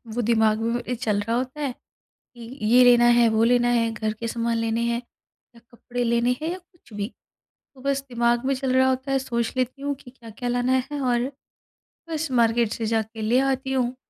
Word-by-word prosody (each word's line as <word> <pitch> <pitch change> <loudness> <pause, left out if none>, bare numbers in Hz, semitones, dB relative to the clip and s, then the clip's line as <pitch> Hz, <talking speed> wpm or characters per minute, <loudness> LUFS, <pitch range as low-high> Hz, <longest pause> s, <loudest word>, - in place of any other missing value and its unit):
वो 245 - 0
दिमाग 220 -1 +2
में 240 +2 -2
चल 215 -4 -1
रहा 230 +3 -1
होता 260 +4 -4
है, 275 -3 -1 0.6
कि 240 - -15 0.3
ये 245 +3 +6
लेना 240 -1 +6
है, 235 - +5
वो 220 0 +2
लेना 240 0 +3
है, 230 -1 +2
घर 215 0 -2
के 230 +2 -5
सामान 230 0 -1
लेने 230 0 -1
हैं 235 +1 -2 0.5
या 235 - -17
कपड़े 245 +1 -4
लेने 235 +1 +1
हैं 320 +2 -2
या 370 - -5
कुछ 345 - -25
भी। 205 +3 -4 0.6
तो 260 - -15
बस 275 0 0
दिमाग 240 +1 +1
में 275 - +2
चल 260 -1 -1
रहा 260 0 +4
होता 260 +1 -2
है, 270 - +2
सोच 235 -3 -2
लेती 255 +2 -2
हूँ 285 0 -2
कि 245 -2 -15
क्या-क्या 245 -1 -7
लाना 250 +1 +1
है 290 -1 -3
और, 250 +1 0 0.8
बस 315 -3 -3
मार्केट 230 -2 +2
से 225 - -3
जाके 220 0 -2
ले 230 +4 +2
आती 265 0 -3
हूँ। 250 -1 0
240 Hz, 210 wpm, -24 LUFS, 230-260 Hz, 0.8 s, ये